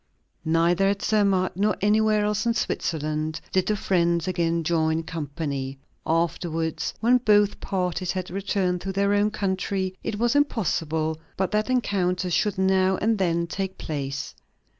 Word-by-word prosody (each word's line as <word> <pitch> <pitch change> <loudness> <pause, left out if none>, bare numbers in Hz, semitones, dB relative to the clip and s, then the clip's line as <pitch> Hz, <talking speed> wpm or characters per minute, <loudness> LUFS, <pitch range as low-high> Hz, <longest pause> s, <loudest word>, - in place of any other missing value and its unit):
Neither 170 +4 +3
at 200 0 -2
Zermatt 200 -4 +2
nor 205 +3 +1
anywhere 215 +1 +3
else 210 +2 0
in 230 - +2
Switzerland 155 -5 -2
did 185 -1 +1
the 215 - +2
friends 170 -3 +1
again 170 -2 0
join 160 0 +1
company. 145 -4 -4 0.3
Afterwards, 165 0 -1
when 245 +2 +4
both 210 -3 +3
parties 180 -2 -2
had 185 -2 -4
returned 190 -2 -1
to 195 - -3
their 200 +1 +1
own 205 +1 +3
country, 190 -2 -2
it 210 - -3
was 235 +4 +1
impossible 160 - 0 0.2
but 190 -1 0
that 215 +3 0
encounters 185 -7 0
should 205 +5 +1
now 190 0 +3
and 220 0 +1
then 170 -2 +1
take 190 +2 -4
place. 140 -3 -4
185 Hz, 145 wpm, -25 LUFS, 165-205 Hz, 0.3 s, when